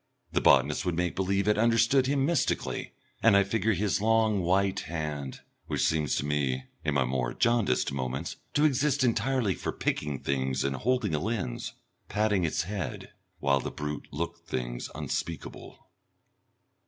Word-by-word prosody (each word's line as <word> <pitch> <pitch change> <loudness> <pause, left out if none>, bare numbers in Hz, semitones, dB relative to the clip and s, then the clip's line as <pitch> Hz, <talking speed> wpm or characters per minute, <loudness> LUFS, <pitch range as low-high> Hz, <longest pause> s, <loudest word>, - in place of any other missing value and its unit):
The - - +1
botanist - - +4
would 90 -2 -1
make 90 0 0
believe 95 +2 0
it 105 0 +3
understood 115 +3 +4
him 135 -1 +2
mystically, 170 +3 -1 0.3
and 110 -3 +6
I 100 - +5
figure 110 +2 +1
his 100 +1 0
long 110 -1 +3
white 95 +2 +2
hand 75 -4 -4 0.3
which - - 0
seems 75 -2 +1
to - - -1
me, 70 -3 0 0.2
in 75 -2 0
my 70 -2 +3
more 60 -1 -1
jaundiced 115 - +2
moments, 65 -1 -3 0.2
to 150 - +4
exist 140 -1 +2
entirely 120 -2 +1
for - - -4
picking 75 -2 -2
things 65 0 -1
and 70 0 0
holding 120 - 0
a 75 - +1
lens 95 - -3 0.4
patting 105 -2 +1
its 80 - 0
head, 95 -4 -5 0.3
while 70 -1 +3
the - - -4
brute 75 0 -5
looked 85 +3 -5
things - - -3
unspeakable.... 85 -1 -5
90 Hz, 155 wpm, -28 LUFS, 70-110 Hz, 0.4 s, and